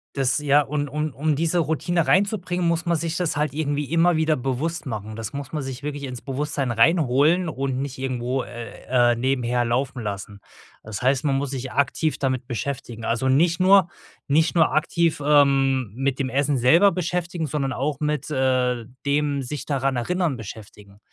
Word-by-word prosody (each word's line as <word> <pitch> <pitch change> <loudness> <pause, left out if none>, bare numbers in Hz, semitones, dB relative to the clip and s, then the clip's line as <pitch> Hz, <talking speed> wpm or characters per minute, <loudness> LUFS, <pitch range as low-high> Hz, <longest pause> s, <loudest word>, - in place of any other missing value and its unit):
Das 135 +1 +1
ja 145 0 +4
und 145 0 -3
um 150 +1 -3
um 150 +3 0
diese 165 +3 +1
Routine 165 +1 0
reinzubringen, 180 -2 +1
muss 170 0 0
man 170 0 +2
sich 165 +1 -3
das 175 -5 -1
halt 150 -2 0
irgendwie 145 -1 -1
immer 165 +1 +4
wieder 160 0 +2
bewusst 135 +7 -3
machen. 110 -4 -5
Das 115 -1 -6
muss 140 -2 -6
man 155 - -2
sich 135 0 -6
wirklich 145 -1 -4
ins 125 -3 -6
Bewusstsein 140 -1 -2
reinholen 155 +6 +3
und 135 -3 -2
nicht 140 -1 -5
irgendwo, 130 0 -2
äh, 120 +1 0
äh, - - +1
nebenher 125 -1 0
laufen 125 +2 -1
lassen. 100 -1 -6 0.4
Das 110 -2 -6
heißt, 130 +3 +1
man 140 -2 +2
muss 140 -1 -2
sich 130 -1 -5
aktiv 140 +3 0
damit 130 -2 -2
beschäftigen. 120 -1 -5
Also 115 +3 0
nicht 165 +6 +3
nur, 190 -1 +5 0.4
nicht 160 +4 +2
nur 170 - +4
aktiv, 160 0 +1
ähm, 135 -5 +3
mit 135 +2 -1
dem 135 -1 -1
Essen 140 +1 +1
selber 165 +12 +5
beschäftigen, 175 -1 -2
sondern 140 -2 -2
auch 140 +2 -2
mit, 150 -1 -2
äh, 130 -3 +1 0.2
dem 140 0 +1
sich 140 +3 -5
daran 135 -2 0
erinnern 170 +2 -1
beschäftigen. 105 -2 -11
140 Hz, 180 wpm, -23 LUFS, 125-155 Hz, 0.4 s, nur